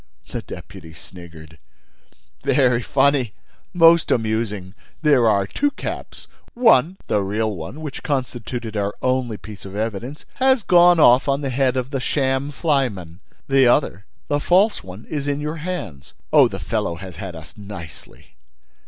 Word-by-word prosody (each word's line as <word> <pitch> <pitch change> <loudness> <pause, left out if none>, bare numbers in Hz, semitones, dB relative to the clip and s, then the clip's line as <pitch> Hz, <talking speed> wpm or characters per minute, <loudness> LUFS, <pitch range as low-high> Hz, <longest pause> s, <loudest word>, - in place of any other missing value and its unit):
The - - -4
deputy 80 +1 -11
sniggered: 80 -3 -13 0.8
"Very 125 -4 +3
funny! 135 -2 +1 0.4
Most 170 -2 +5
amusing! 110 -4 -1 0.3
There 135 -7 +4
are 100 -2 +2
two 290 - 0
caps—One, 190 - -1
the 105 - 0
real 105 +2 -1
one, 85 - -8
which 150 -4 -6
constituted 125 -4 -4
our 100 0 -2
only 130 -4 0
piece 105 -1 -11
of 95 0 -9
evidence, 115 +6 -4
has 260 -2 +3
gone 175 -1 +5
off 125 -2 +6
on 140 +1 +1
the 135 -2 -2
head 130 0 +1
of 130 +1 -3
the 135 - -1
sham 135 +1 0
flyman! 125 - -1 0.3
The 135 -2 +4
other, 110 - +1 0.2
the 145 - 0
false 190 +8 +2
one, 95 +3 -11
is 145 -2 -4
in 145 0 -1
your 150 +2 -4
hands. 150 - -6 0.2
Oh, - - +7
the - - -6
fellow 85 - -2
has 90 -1 -10
had 90 -1 -7
us 80 0 -12
nicely!" 85 - -11
125 Hz, 150 wpm, -21 LUFS, 100-145 Hz, 0.8 s, Oh